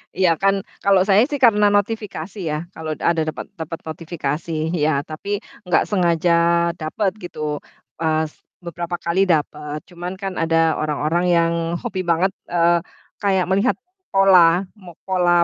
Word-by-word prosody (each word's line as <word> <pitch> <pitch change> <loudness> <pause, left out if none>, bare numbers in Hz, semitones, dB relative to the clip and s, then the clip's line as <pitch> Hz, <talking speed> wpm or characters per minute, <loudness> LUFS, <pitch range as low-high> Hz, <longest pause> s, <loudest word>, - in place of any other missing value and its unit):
Iya 185 -2 +3
kan 195 0 +4 0.3
kalau 195 -2 +5
saya 200 +1 +5
sih 290 -1 -3
karena 210 -3 +6
notifikasi 205 -3 -1
ya, 150 - -1 0.2
kalau 160 -1 -5
ada 165 0 +1
dapet 155 - -4
dapet 165 +1 -5
notifikasi, 160 -1 -4 0.3
iya 150 -2 +1
tapi 155 +6 -8 0.4
gak 180 - +3
sengaja 175 -3 +2 0.5
dapet 180 +5 -1
gitu. 150 -4 -4 0.4
Pas 160 -1 0 0.3
beberapa 170 0 -4
kali 175 +3 +1
dapet, 150 -2 -1
cuman 175 +1 -5
kan 195 -1 -3
ada 165 0 +1 0.2
orang-orang 155 +3 0
yang 170 -1 +3 0.3
hobi 190 -1 -3
banget, 170 +3 +2 0.2
eee, 170 0 +3 0.4
kayak 190 -3 +2
melihat 200 +7 +2 0.3
pol 195 0 +4
a 175 +1 +6 0.2
mo 175 -4 -13
pola 175 -2 +3
175 Hz, 145 wpm, -21 LUFS, 160-190 Hz, 0.5 s, karena